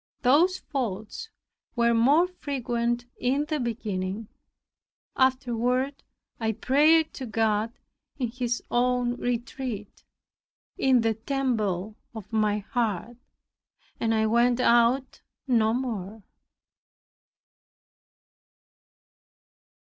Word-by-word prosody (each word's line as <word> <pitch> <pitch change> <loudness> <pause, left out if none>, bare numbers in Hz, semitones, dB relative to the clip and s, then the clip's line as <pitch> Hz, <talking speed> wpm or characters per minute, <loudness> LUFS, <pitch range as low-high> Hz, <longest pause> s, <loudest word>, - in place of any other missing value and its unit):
Those 325 +9 +4
faults 240 - -4 0.5
were 235 -1 +3
more 275 +9 +5
frequent 240 -8 -2
in 275 +4 +1
the 305 0 -2
beginning. 210 -3 -3 0.9
Afterward 255 +1 +1 0.4
I 220 -1 0
prayed 305 +7 +3
to 260 - -6
God 220 0 +1 0.5
in 250 -5 -1
His 245 -1 -2
own 245 0 +2
retreat, 240 -3 -4 0.7
in 260 -2 +3
the 225 0 +2
temple 220 -5 -2 0.2
of 220 0 -9
my 210 -1 +2
heart, 230 -1 -1 0.8
and 225 -1 +1
I 220 0 +2
went 235 +2 +3
out 240 +2 +3 0.3
no 225 -4 +3
more. 220 -4 -4
240 Hz, 85 wpm, -26 LUFS, 220-260 Hz, 0.9 s, more